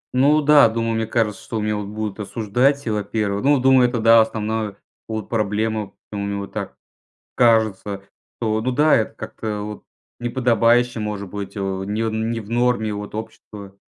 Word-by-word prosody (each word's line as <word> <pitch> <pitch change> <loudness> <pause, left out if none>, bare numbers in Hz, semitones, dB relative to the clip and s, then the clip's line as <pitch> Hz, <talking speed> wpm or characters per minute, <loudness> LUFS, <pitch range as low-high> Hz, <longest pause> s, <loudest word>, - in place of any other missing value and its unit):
Ну 145 +3 +4
да, 145 -4 +7
думаю, 115 0 -1
мне 110 0 -1
кажется, 110 -2 -1
что 110 - -4
меня, 105 0 -1
вот, 105 -1 -4
будут 105 -1 -5
осуждать, 120 +7 0
и 115 - -1
во-первых. 105 0 -2
Ну, 145 -1 +4
думаю, 130 -1 +5
это 120 -2 -2
да, 115 0 +7
основная, 110 -2 -2 0.3
вот, 110 -1 -4
проблема. 110 -1 -1 0.2
Мне 100 -1 -3
вот 100 0 -7
так, - - -5 0.6
кажется, 110 -4 +2 0.4
что, 110 -1 0
ну 130 +3 -1
да, 150 +4 +4
это 110 - 0
как-то, 110 -1 -5
вот, 105 0 -7 0.4
неподобающе 120 -1 +2
может 105 -2 -4
быть, 100 +2 -6
не 95 +2 -2
в 110 - -1
не 115 +1 -1
в 105 -1 -10
норме 120 -3 +1
вот 105 0 -6
общество 105 -2 -9
110 Hz, 170 wpm, -21 LUFS, 105-120 Hz, 0.6 s, да